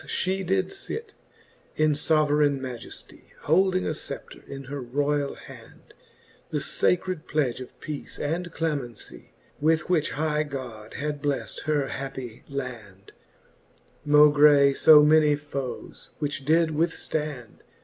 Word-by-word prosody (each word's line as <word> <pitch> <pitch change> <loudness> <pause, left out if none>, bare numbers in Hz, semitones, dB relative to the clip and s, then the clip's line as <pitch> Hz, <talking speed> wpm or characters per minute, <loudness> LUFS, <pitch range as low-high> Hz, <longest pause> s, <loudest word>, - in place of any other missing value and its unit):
Thus - - -14
fhe 190 +1 -1
did 190 - 0 0.2
lit 445 -1 -5 0.6
in 155 -1 +3
foverayne 150 -2 +2
Majeftie, 125 -3 -9
Holding 185 +4 +2
a - - 0
fcepter 145 -2 -7
in 135 0 -7
her 140 +1 -6
royall 145 +3 -1
hand, - - -14 0.6
The - - -2
facred 180 -2 0
pledge 135 -5 0
of 130 - -11
peace 150 -2 -7
and 170 +4 -3
clemencie. 145 -9 -4 0.3
With 160 +3 +1
which 155 -4 +1
high 150 +1 0
God 125 -7 -7
had 145 +1 -3
bleft 145 -2 -3
her 145 -3 0
happie 130 -4 -6
land, 115 -8 -7 0.9
Maugie 145 -1 +6
fo 150 +2 +7
many 150 -1 +5
foes, 140 -3 -7
which 145 -3 -3
did 160 +2 +3
withftand. 150 -5 -2
150 Hz, 125 wpm, -26 LUFS, 135-155 Hz, 0.9 s, fo